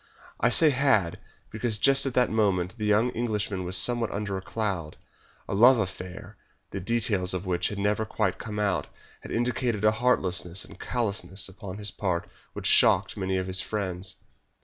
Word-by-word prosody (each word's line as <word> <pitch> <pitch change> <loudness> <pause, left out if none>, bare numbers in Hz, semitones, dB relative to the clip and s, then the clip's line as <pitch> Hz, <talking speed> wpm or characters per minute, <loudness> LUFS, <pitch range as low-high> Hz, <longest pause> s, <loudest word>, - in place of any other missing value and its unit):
I - - +3
say 160 -2 +5
"had," 130 -11 +2 0.3
because 110 0 0
just 135 +4 +3
at 130 - -4
the 125 -1 +4
moment 95 -4 0
the 105 - -1
young 110 +4 +3
Englishman 105 -5 -2
was 90 +1 0
somewhat 120 0 +2
under 100 -1 -3
a 95 - -4
cloud. 95 -6 -3 0.5
A - - -4
love 120 +6 +6
affair, 95 -3 -6 0.3
the 100 - -4
details 100 -3 0
of 90 +1 -4
which 90 -2 0
had 105 - -5
never 105 +2 0
quite 110 -3 -1
come 105 -2 -6
out, 100 -7 0 0.3
had - - -10
indicated 120 -3 -1
a 105 - +6
heartlessness 95 -7 +1
and - - -14
callousness 100 -5 -1
upon 95 0 -9
his 105 -1 -3
part 90 -4 -2 0.3
which - - -7
shocked - - +4
many 95 -1 -1
of 95 - -2
his 95 0 +1
friends. 95 -3 -4
105 Hz, 175 wpm, -27 LUFS, 95-115 Hz, 0.5 s, love